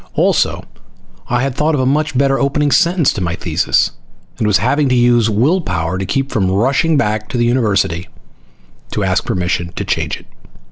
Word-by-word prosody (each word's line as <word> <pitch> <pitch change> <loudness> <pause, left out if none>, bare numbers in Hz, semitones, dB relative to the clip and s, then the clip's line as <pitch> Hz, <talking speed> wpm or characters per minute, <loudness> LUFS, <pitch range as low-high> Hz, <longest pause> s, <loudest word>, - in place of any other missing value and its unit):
Also, - - +1 0.6
I 125 +1 0
had 135 -1 -1
thought 150 +4 0
of - - -1
a 130 - +1
much 150 +1 0
better 135 0 +2
opening 145 +1 +1
sentence 170 -2 +3
to 100 - -5
my 85 -1 -2
thesis, 85 -1 0 0.5
and 110 - +1
was 105 -1 +4
having 140 +4 +1
to 130 - +2
use 120 -2 +3
will 135 - +2
power 85 - -2
to 95 - -4
keep 135 +7 -1
from 95 -6 0
rushing 135 +11 +1
back 105 -4 -1
to 125 - -3
the 120 - +2
university 100 -8 0 0.9
to - - -1
ask - - 0
permission 90 -1 -2
to - - -4
change - - -2
it. - - -17
120 Hz, 190 wpm, -16 LUFS, 95-140 Hz, 0.9 s, was